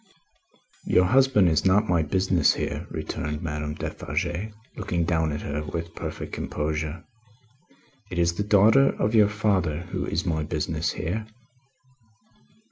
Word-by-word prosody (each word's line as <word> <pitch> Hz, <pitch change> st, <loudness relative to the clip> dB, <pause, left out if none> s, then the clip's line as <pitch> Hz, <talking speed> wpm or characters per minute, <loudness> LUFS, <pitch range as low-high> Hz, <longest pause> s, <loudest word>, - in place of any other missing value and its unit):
"Your 90 Hz, -, +4 dB
husband 130 Hz, -3 st, +4 dB
is 80 Hz, -2 st, +2 dB
not 100 Hz, +3 st, +3 dB
my 85 Hz, -2 st, +3 dB
business 90 Hz, +1 st, +2 dB
here," -, -, -3 dB
returned 75 Hz, +2 st, -4 dB
Madame 75 Hz, -1 st, -3 dB
Defarge, 90 Hz, +6 st, -3 dB, 0.3 s
looking 90 Hz, -5 st, -1 dB
down 80 Hz, -2 st, +1 dB
at 75 Hz, -, -4 dB
her 75 Hz, +1 st, -3 dB
with 80 Hz, +2 st, -5 dB
perfect -, -, -6 dB
composure. 75 Hz, +2 st, -3 dB, 1.1 s
"It 90 Hz, -, -5 dB
is 85 Hz, 0 st, +2 dB
the 100 Hz, -, -2 dB
daughter 110 Hz, +7 st, +5 dB
of 105 Hz, -, +1 dB
your 105 Hz, -2 st, +5 dB
father 95 Hz, -7 st, 0 dB
who -, -, -2 dB
is 90 Hz, -, -1 dB
my 80 Hz, -3 st, 0 dB
business 75 Hz, +1 st, -2 dB
here." 105 Hz, +7 st, -3 dB
85 Hz, 135 wpm, -25 LUFS, 75-100 Hz, 1.1 s, daughter